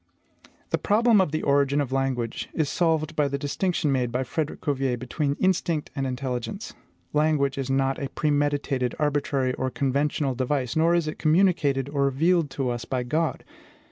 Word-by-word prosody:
"The - - +1
problem 220 0 +4
of 180 - 0
the 155 - -2
origin 140 0 +2
of 140 -3 -1
language 130 -4 -2
is 155 -3 0
solved 160 -3 0
by 150 -2 +2
the 140 0 -2
distinction 150 +2 -1
made 125 -3 0
by 125 +2 0
Frederic 150 +4 -3
Cuvier 135 -3 0
between 140 +4 -2
instinct 175 -4 0
and 135 -1 -1
intelligence. 130 - -4 0.4
Language 150 -2 +2
is 135 -1 -3
not 135 0 +1
a 140 - -3
premeditated, 145 -4 0
arbitrary, 145 -3 0
or 130 - -2
conventional 140 +1 0
device; 130 0 -1
nor 165 +2 +3
is 170 -2 +1
it 155 - -5
communicated 155 -5 +2
or 140 -1 0
revealed 160 +4 +2
to 135 -2 -2
us 120 -1 -4
by 130 -2 -2
God. 155 +3 -1
140 Hz, 170 wpm, -25 LUFS, 135-155 Hz, 0.4 s, problem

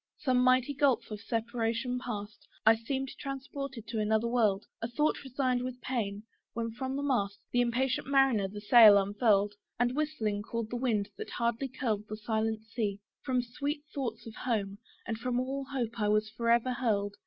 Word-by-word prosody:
Some 255 -2 +2
mighty 255 +2 +4
gulph 265 -5 +2
of 210 -1 -5
separation 230 +2 -1
past, 210 -4 -6 0.2
I 220 +1 +8
seemed 265 +4 -3
transported 275 -3 -5
to 220 +1 -3
another 220 +2 +2
world: 215 -5 +2 0.2
A 230 - -1
thought 295 +7 0
resigned 255 -2 0
with 250 0 -5
pain, 210 -6 -3 0.3
when 230 0 -2
from 260 +3 -4
the 280 - -2
mast 205 -8 0
The 245 - +3
impatient 250 +2 0
mariner 270 -7 +3
the 205 +2 -8
sail 215 -1 +9
unfurl'd, 205 0 +2 0.3
And 245 +1 +2
whistling, 280 -10 -1
called 225 +1 -4
the - - -2
wind 230 -5 0
that 435 - -5
hardly 235 +3 -1
curled 220 -5 -2
The 215 - -4
silent 220 0 -1
sea. 215 -3 -2 0.2
From 255 -3 +1
the 240 - -11
sweet 290 +2 -2
thoughts 235 -5 -4
of 225 - -8
home, 205 -5 -2 0.3
And 225 -1 -3
from 245 +1 0
all 270 +2 -2
hope 245 -4 -3
I 210 - +1
was 215 +1 +2
forever 235 +2 +2
hurled. 205 -5 0
235 Hz, 180 wpm, -31 LUFS, 215-255 Hz, 0.3 s, sail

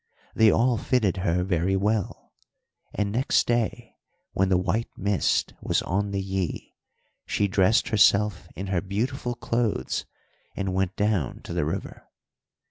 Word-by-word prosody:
They 110 -1 +5
all 120 +2 +3
fitted 110 -7 +1
her 90 -1 0
very 90 0 0
well; 105 +1 -1 0.6
and 105 -1 -1
next 125 +5 +2
day 120 0 -2 0.3
when 95 0 +1
the 95 - +4
white 100 +5 -1
mist 100 0 +1
was - - 0
on 100 +3 -1
the 100 -1 -2
Yí 95 -3 -3 0.6
she 100 - +1
dressed 100 +4 +3
herself 105 -3 +3
in 95 +4 -5
her 90 - +1
beautiful 120 +6 -2
clothes 115 - -1 0.5
and 95 -1 -2
went 95 0 0
down 100 - 0
to - - -7
the - - 0
river. 80 - -5
100 Hz, 140 wpm, -25 LUFS, 95-110 Hz, 0.6 s, They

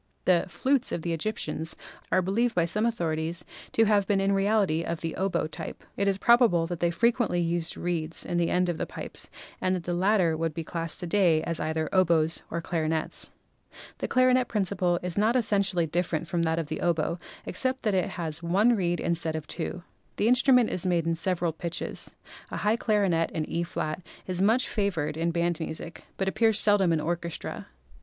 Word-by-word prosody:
The 180 -1 +3
"flutes" 265 +5 +1
of 165 - -3
the 170 - -1
Egyptians 165 -2 -2 0.4
are 185 - +3
believed 225 +6 +1
by 170 -2 +3
some 210 +7 +1
authorities 170 -5 -2 0.3
to 225 - +4
have 205 -2 +3
been 200 -1 +2
in 195 0 +2
reality 195 -4 +2
of 170 -1 -4
the 165 -1 -3
oboe 190 -4 0
type. 155 - -7
It 200 - 0
is 195 -1 +2
probable 235 -7 +4
that 170 0 -5
they 170 - +2
fre 225 +8 +3
quently 180 -8 0
used 170 -1 -2
reeds 165 -2 -2
in 175 - -2
the 170 -1 +2
end 180 0 +2
of 175 -2 -1
the - - -3
pipes - - -7 0.3
and 185 0 +1
that 180 - -4
the 175 - -2
latter 180 -2 +3
would 165 -1 -2
be 165 - -3
classed 165 +2 -4
to - - -3
day 170 -3 +3
as 165 - -2
either 160 0 -1
oboes 170 -3 +3
or 170 - -3
clarinets. 160 -2 -2 0.7
The - - -2
clarinet 255 -1 +3
principle 185 -4 0
is 180 +2 -1
not 220 +4 +3
essentially 200 -7 +2
different 165 0 -1
from 170 +1 -1
that 160 0 +1
of 165 - -1
the 155 - -5
oboe, 170 0 0 0.3
except 260 0 -1
that 210 -3 +1
it 185 -2 +1
has 160 -2 -3
one 200 +8 +3
reed 175 -4 0
instead 165 -2 -1
of 155 -1 -4
two. 175 +3 -5 0.3
The 210 - +1
instrument 250 -1 +5
is 180 - -2
made 175 -3 +1
in 165 - +1
several 170 0 -1
pitches. 170 +1 -5 0.3
A - - -5
high 210 +1 +2
clarinet 200 -8 +1
in 155 -1 -3
E& 170 - -1 0.6
is 185 -1 -2
much 225 +6 +3
favored 185 -9 -1
in 165 +1 0
band 170 0 0
music, 160 +1 -6
but 190 - -1
appears 220 +2 +2
seldom 205 -4 +3
in 160 - +2
orchestra. 170 +1 -4
175 Hz, 195 wpm, -27 LUFS, 165-205 Hz, 0.7 s, instrument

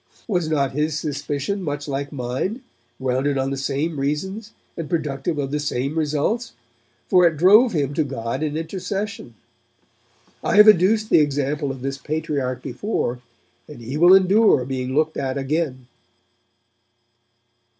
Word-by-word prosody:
Was 175 -7 0
not 140 -4 +1
his 150 +2 -1
suspicion 145 +6 -3
much 145 -3 -4
like 140 0 -3
mine, 140 - -3 0.4
grounded 130 +2 0
on 135 0 -1
the - - -1
same 140 +3 -2
reasons 190 +10 -3 0.2
and 165 -3 -6
productive 150 -2 -2
of 140 -2 -2
the 150 - -1
same 140 0 -2
results? 160 +10 -1 0.5
For 180 -2 +5
it 165 -2 -1
drove 210 - +6
him 145 -3 -1
to 155 - +1
God 125 -2 -4
in 155 -1 -2
intercession. 190 - -5 1.1
I - - 0
have 210 +1 +8
adduced 215 +2 +4
the - - +7
example 145 0 0
of 130 -1 -6
this 135 0 -3
Patriarch 145 -5 -3
before, 125 - -3 0.5
and 150 - -11
he 120 +4 -6
will 175 +4 +7
endure 195 - +4
being 130 0 -3
looked 155 +1 +1
at 135 -1 -2
again.' 135 -2 -2
150 Hz, 145 wpm, -22 LUFS, 135-175 Hz, 1.1 s, have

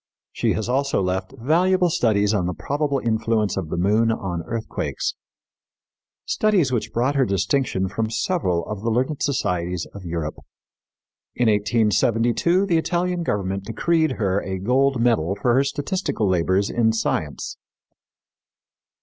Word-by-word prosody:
She - - 0
has 110 - -2
also 140 +1 +1
left 95 0 -1
valuable 175 +7 +2
studies 110 - +2
on 90 -4 0
the 90 - -3
probable 145 0 -1
influence 110 -3 0
of 95 -5 -3
the - - -3
moon 105 +5 +3
on 90 -6 -3
earthquakes 115 -1 -3 1.1
studies 195 -11 +2
which 120 -4 -1
brought 125 +4 +1
her 140 -2 +3
distinction 100 -1 0
from 110 +3 -2
several 110 - 0
of 105 -2 -5
the 115 - -1
learned 130 +6 0
societies 90 - -1
of 100 - -9
Europe. 85 -3 -4 1.0
In 125 - +1
1872 115 - +2
the 170 -4 +2
Italian 175 +1 -1
government 100 - -2
decreed 160 +8 +1
her 100 -2 0
a 95 -2 -4
gold 130 +6 +2
medal 115 -7 +2
for 120 +3 +2
her 135 +3 +4
statistical 145 - -2
labors 95 +2 +1
in 110 -2 +2
science. 80 -9 -2
115 Hz, 140 wpm, -22 LUFS, 95-140 Hz, 1.1 s, her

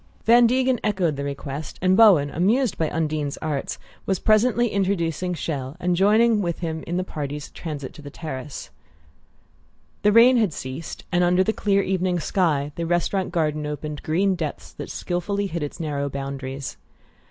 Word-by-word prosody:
Van 235 +1 +7
Degen 255 0 +2
echoed 190 -7 +1
the 140 - -4
request, 140 +1 -5
and 185 0 +3
Bowen, 185 -10 +6
amused 220 - +2
by 160 -2 0
Undine's 155 -3 -2
arts, 150 -3 -3 0.3
was 190 - +1
presently 235 +4 +3
introducing 185 -3 -1
Chelles, 145 -2 -4
and 180 0 +1
joining 215 +4 +4
with 170 -3 -2
him 160 -2 -4
in 175 +1 -1
the 185 - 0
party's 145 -4 -5
transit 145 -5 -6
to 150 - -12
the 145 - -8
terrace. 140 -3 -7 1.3
The 210 - +4
rain 240 +4 +7
had 215 -8 +2
ceased, 130 +5 -7
and 175 0 +3
under 180 +1 +4
the 220 - 0
clear 200 -2 +1
evening 185 -1 0
sky 155 -6 0
the 170 -1 -2
restaurant 175 +2 0
garden 155 -3 0
opened 150 0 -5
green 190 +5 +1
depths 160 -5 -5
that - - -7
skilfully 200 +3 -2
hid 170 -4 -3
its 145 +3 -5
narrow 145 -3 -2
boundaries. 135 - -5
170 Hz, 165 wpm, -23 LUFS, 150-195 Hz, 1.3 s, Van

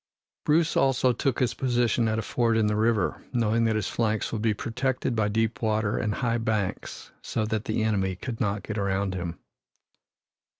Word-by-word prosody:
Bruce 160 +2 +3
also 130 -1 +3
took 130 +1 0
his 120 -3 +1
position 120 -2 +1
at 110 0 0
a 115 - -1
ford 115 -2 +1
in 110 - +3
the 105 0 +1
river, 110 -3 +1
knowing 115 -1 +2
that 110 -1 +2
his 110 -3 -1
flanks 110 -2 -1
would 110 - -2
be 110 0 +2
protected 125 +3 -1
by 110 -2 +2
deep 110 0 0
water 110 -1 +1
and 105 -2 -1
high 120 -2 0
banks 110 -4 -3
so 110 - -2
that 110 0 -2
the 110 0 0
enemy 95 -4 0
could 115 +5 -6
not 100 -2 0
get 110 0 -4
around 100 0 0
him. 85 -2 -4
110 Hz, 185 wpm, -26 LUFS, 105-120 Hz, -, Bruce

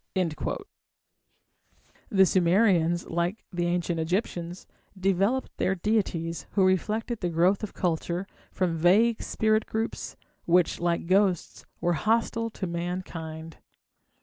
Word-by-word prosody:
The 190 -1 +5
Sumerians, 175 -2 +3
like 170 +5 -2
the 175 0 0
Ancient 175 -1 -1
Egyptians, 175 0 -2 0.3
developed 195 +7 +1
their 190 - +1
deities, 170 -7 -1
who 195 -2 +4
reflected 215 +5 0
the 175 - -1
growth 175 +4 +2
of 215 - -6
culture, 175 +1 -1 0.3
from 180 -3 0
vague 205 +8 +4
spirit 220 0 +1
groups, 225 +1 -3 0.3
which, 175 0 +3
like 170 -1 0
ghosts, 185 -1 +1
were 175 - +1
hostile 230 +4 +1
to 210 - -5
mankind. 170 -2 -5
180 Hz, 110 wpm, -27 LUFS, 170-205 Hz, 0.3 s, The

